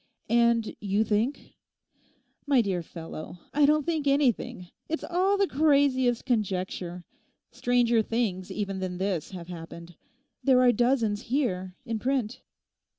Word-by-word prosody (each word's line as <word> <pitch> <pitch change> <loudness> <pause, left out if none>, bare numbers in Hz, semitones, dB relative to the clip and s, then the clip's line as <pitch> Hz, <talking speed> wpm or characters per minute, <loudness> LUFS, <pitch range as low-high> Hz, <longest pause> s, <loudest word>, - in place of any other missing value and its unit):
And 235 -1 +3
you 205 +1 +1
think?' 220 +6 -1 0.9
'My 275 -4 +5
dear 190 -5 -1
fellow, 165 0 -8 0.2
I 290 0 +4
don't 300 0 +3
think 320 -4 -1
anything. 255 -10 +1 0.2
It's 320 - -2
all 375 +3 +1
the 395 - +3
craziest 275 -6 +2
conjecture. 185 -6 -2 0.5
Stranger 240 -2 +2
things 215 -5 -2
even 195 -2 -3
than 185 -1 -4
this 190 -4 -2
have 180 -3 -8
happened. 170 0 -9 0.5
There 260 -2 +5
are 250 -1 +6
dozens 235 -3 +1
here—in 220 -3 -2
print. 255 -3 -1
230 Hz, 125 wpm, -27 LUFS, 185-270 Hz, 0.9 s, are